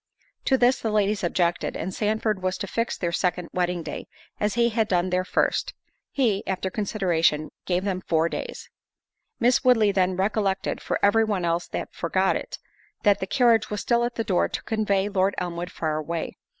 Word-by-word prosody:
To 265 - +4
this 250 +1 +3
the 225 - -2
ladies 210 -1 +1
objected, 175 0 0
and 185 - -4
Sandford 215 -1 0
was 185 0 -1
to 205 - -4
fix 230 +4 -2
their 170 -2 -1
second 180 -1 -1
wedding 180 -1 0
day, - - -6 0.3
as 210 +1 0
he 235 0 +3
had 220 -1 +1
done 180 -1 +1
their 180 0 +1
first. - - 0 0.3
He, 225 -8 +1
after 190 0 -2
consideration, 175 -8 +1 0.2
gave 180 0 +1
them 190 -2 -2
four 165 -2 +1
days. - - -6 0.7
Miss 245 +1 +3
Woodley 225 -5 +5
then 185 -1 +1
recollected 195 -1 0
(for - - -1
every 215 +3 +5
one 205 -5 -1
else 170 +1 -1
had - - -3
forgot - - +1
it) - - -5 0.5
that 205 -2 +4
the 190 - -3
carriage 235 0 +3
was 210 -1 -3
still 235 -1 +2
at 240 0 -2
the 225 - -1
door 190 -4 +1
to - - -5
convey 205 -3 0
Lord 195 -1 +1
Elmwood 175 0 -4
far 155 -2 -2
away. 165 +2 -4
195 Hz, 190 wpm, -25 LUFS, 180-220 Hz, 0.7 s, Woodley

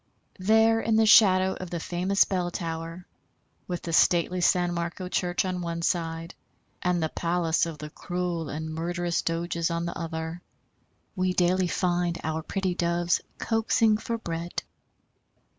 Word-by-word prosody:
There 220 +3 +4
in 225 - +1
the 220 0 +5
shadow 190 -4 +6
of 185 - -7
the 170 - -3
famous 180 +4 +2
bell 180 -3 -1
tower, 165 +1 -5 0.6
with 175 -1 -4
the 165 - -4
stately 175 +2 +3
San 175 0 +3
Marco 170 +2 -4
church 180 0 0
on 180 -1 -2
one 170 -1 -3
side 165 0 -1 0.5
and 180 -3 +1
the 160 - 0
palace 170 0 0
of 165 -2 -6
the 150 0 -8
cruel 175 -3 -3
and 160 +1 -5
murderous 175 +1 -1
Doges 170 0 -1
on 170 0 -2
the 170 - -4
other, 160 +1 -5 0.7
we 185 -1 +1
daily 180 +1 +2
find 175 -1 0
our 160 0 -2
pretty 190 +2 -2
Doves 170 0 +1 0.2
coaxing 225 -1 +2
for 230 +1 -3
bread. 170 -4 -4
175 Hz, 150 wpm, -27 LUFS, 165-185 Hz, 0.7 s, shadow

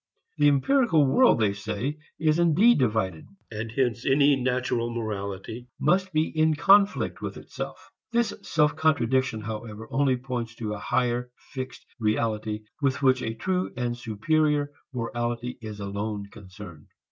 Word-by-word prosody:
The 145 - +5
empirical 160 - +4
world, 245 - +5
they 105 -3 +2
say, 120 +8 -4 0.2
is 155 +1 +2
indeed 175 +7 +5
divided, 105 -9 0 0.2
and 110 +1 -5
hence 120 -1 0
any 140 +1 +4
natural 125 -2 -1
morality 110 +1 -5
must 185 +1 +2
be 155 -1 +2
in 155 0 +2
conflict 200 +5 +4
with - - -5
itself. - - -8 0.2
This 235 -1 +1
self 150 -2 +1
contradiction 130 -7 +1
however 110 0 -6
only 135 -1 +2
points 125 -2 -5
to 110 -2 -4
a 105 - -5
higher 125 +2 0 0.2
fixed 130 -1 -6
reality 110 -1 -1 0.2
with 140 0 0
which 130 -1 +4
a 115 -1 -3
true 185 +9 -1
and 120 -1 -1
superior 145 +6 0 0.2
morality 120 0 -3
is 110 -2 -7
alone 100 +1 -4
concerned. 95 -5 -12
125 Hz, 140 wpm, -26 LUFS, 110-145 Hz, 0.2 s, The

